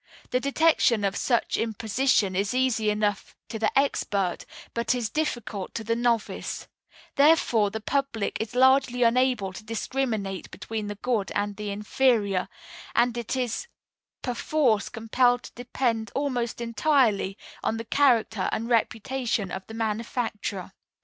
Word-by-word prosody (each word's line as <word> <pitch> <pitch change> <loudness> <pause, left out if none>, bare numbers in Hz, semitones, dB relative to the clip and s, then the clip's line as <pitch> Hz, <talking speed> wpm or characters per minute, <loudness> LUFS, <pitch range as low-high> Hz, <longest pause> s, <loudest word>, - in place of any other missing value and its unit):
The 250 - +2
detection 280 -5 +3
of 200 0 0
such 240 -3 +1
imposition 220 -2 +1
is 200 +5 0
easy 250 -4 +2
enough 210 -1 -1
to 220 - -5
the 215 - +2
expert, 200 -9 0 0.3
but 235 +2 +1
is 235 -3 -2
difficult 240 -10 -3
to 225 - -3
the 230 +1 0
novice; 235 -2 -1 0.5
therefore 280 -8 +4
the 220 +2 -5
public 265 -4 -1
is 225 +2 -5
largely 260 -1 +4
unable 235 -5 +2
to 215 - -9
discriminate 220 -3 -2
between 215 0 -5
the 205 - -4
good 215 -2 -1
and 205 0 -1
the 210 0 -5
inferior, 205 -2 +1 0.5
and 240 0 +3
it 235 +1 -3
is 250 - -2 0.6
perforce 245 -3 +1
compelled 245 +2 +2
to - - -11
depend 240 -2 -2
almost 250 -5 -1
entirely 230 -5 +2 0.2
on 225 - -1
the 230 - -5
character 230 -7 +2
and 230 +2 -2
reputation 230 -3 0
of 190 0 -6
the 220 - -8
manufacturer. 220 -3 -3
230 Hz, 135 wpm, -26 LUFS, 210-250 Hz, 0.6 s, therefore